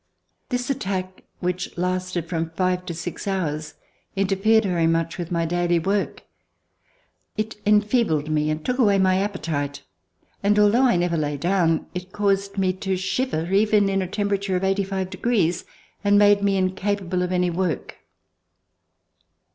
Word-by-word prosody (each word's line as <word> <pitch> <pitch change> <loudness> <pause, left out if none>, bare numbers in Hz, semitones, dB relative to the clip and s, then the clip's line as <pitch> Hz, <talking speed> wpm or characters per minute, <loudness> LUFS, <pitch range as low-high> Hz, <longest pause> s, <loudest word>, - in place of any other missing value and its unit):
This 245 +1 -1
attack 190 -7 -4 0.2
which 180 0 -3
lasted 180 -1 -2
from 165 -1 -2
five 180 0 0
to 170 - -3
six 175 +4 -6
hours 155 -6 -2 0.4
interfered 200 +3 +3
very 175 -4 +1
much 165 +1 0
with 175 -1 -4
my 170 -1 0
daily 175 +1 +1
work. 195 +4 -1 1.1
It 215 0 -3
enfeebled 210 - +2
me 155 0 0
and 155 0 -3
took 250 +1 -1
away 205 -5 +4
my 185 -1 +3
appetite, 155 -8 -3 0.6
and, 205 +1 +2
although 210 +5 +5
I 240 - +3
never 175 -1 +1
lay 145 -2 -1
down, 170 0 +1
it 180 +1 -6
caused 200 -1 0
me 185 -1 +2
to 190 -1 0
shiver 190 -3 -2
even 210 0 +4
in 195 0 +1
a 185 - -2
temperature 200 -1 -1
of 180 - -1
eighty 195 +1 +1
five 190 -1 -3
degrees, 190 -4 0 0.4
and 205 0 +4
made 205 0 +5
me 200 -1 +2
incapable 190 -1 -1
of 180 0 -1
any 180 -1 +1
work. 170 -4 -2
185 Hz, 155 wpm, -23 LUFS, 175-200 Hz, 1.1 s, although